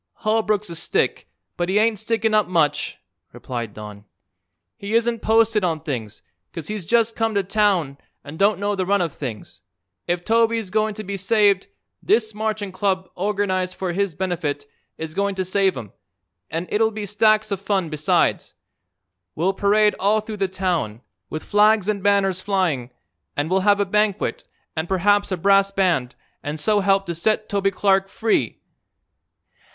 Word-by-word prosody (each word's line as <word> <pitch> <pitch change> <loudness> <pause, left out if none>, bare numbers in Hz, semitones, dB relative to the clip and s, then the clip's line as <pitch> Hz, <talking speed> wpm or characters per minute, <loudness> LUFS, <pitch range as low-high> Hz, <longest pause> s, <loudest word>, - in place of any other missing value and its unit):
"Holbrook's 215 -3 +1
a - - -6
stick, - - -1 0.3
but 175 0 -1
he 195 - +2
ain't 215 -1 +2
stickin' 225 0 0
up 215 -2 +3
much," 165 -5 0 0.4
replied 120 -4 -5
Don. 105 -1 -10 0.7
"He 210 0 -4
isn't 230 0 +1
posted 225 -1 +3
on 165 -3 0
things, 120 -9 -6 0.3
'cause 165 -3 -7
he's 210 -6 -5
just 230 -1 +2
come 225 -1 -1
to 200 - +2
town 185 -8 +1 0.2
and 150 +2 -10
don't 200 0 +3
know 205 +1 0
the 185 -2 -2
run 200 +1 +3
of 165 -4 -2
things. 110 -9 -7 0.5
If 175 0 -1
Toby's 225 -2 +1
goin' 215 0 0
to 215 - -6
be 200 0 -4
saved, 200 -1 +2 0.3
this 220 0 +1
Marching 215 -2 -3
Club, 185 0 -1
organized 185 -1 -1
for 185 -2 -3
his 195 -3 -1
benefit, 160 -6 -2 0.3
is 160 -1 -6
goin' 200 +2 -1
to 190 -1 -2
save 190 -3 +1
him, 110 -6 -8 0.6
and 165 +3 -3
it'll 220 +1 +3
be 215 -1 -6
stacks 215 +1 +2
of 195 -1 -2
fun 195 -4 -1
besides. 155 -1 0 0.8
We'll 180 +5 +1
parade 210 +2 +3
all 205 +3 +3
through 215 0 -7
the 195 -1 0
town, 175 - -2 0.3
with 155 - -5
flags 210 -1 +3
an' 210 -2 -1
banners 195 -2 +2
flying, 180 -12 0 0.5
an' 145 +2 -1
we'll 190 +1 +2
have 200 +1 +3
a 200 - +2
banquet, 210 0 0 0.3
an' 160 +1 -2
perhaps 200 +2 +2
a 185 - 0
brass 195 +2 +4
band, 175 -10 0 0.3
an' 145 +2 -4
so 210 +7 +2
help 195 0 +2
to 170 - -3
set 215 +5 0
Toby 200 -1 +1
Clark 195 0 +2
free." 220 +3 -1
195 Hz, 165 wpm, -22 LUFS, 175-210 Hz, 0.8 s, brass